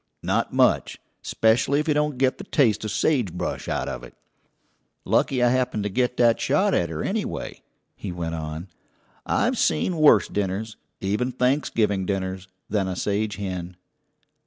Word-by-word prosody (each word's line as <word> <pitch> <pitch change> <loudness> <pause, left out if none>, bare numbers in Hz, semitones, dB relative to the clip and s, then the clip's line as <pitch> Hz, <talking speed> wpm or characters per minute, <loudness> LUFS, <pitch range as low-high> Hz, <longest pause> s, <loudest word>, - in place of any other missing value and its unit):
"Not - - 0
much. - - +2 0.2
'Specially 120 +6 +2
if 150 - -2
you 155 - +3
don't 150 -2 0
get 130 0 +1
the - - -6
taste 120 -9 +2
of 110 - -3
sage 125 - +1
brush 90 - -4
out - - -2
of - - -5
it. 60 - -12 0.9
Lucky 125 -2 +2
I 120 - +5
happened 125 -4 0
to 105 - -1
get 125 +4 0
that 120 -2 +4
shot - - +2
at 85 - +1
her, 80 -1 -4
anyway," - - -3 0.3
he 100 - -6
went 85 -2 -4
on, 80 +2 -5 0.6
"I've - - +1
seen 125 - +1
worse 155 -1 +6
dinners 105 +2 -3 0.3
even 105 +6 0
Thanksgiving 115 -7 +1
dinners 95 -1 -3 0.2
than 100 -2 0
a 95 - -3
sage 105 +3 -1
hen." 90 -3 -5
105 Hz, 160 wpm, -24 LUFS, 95-125 Hz, 0.9 s, worse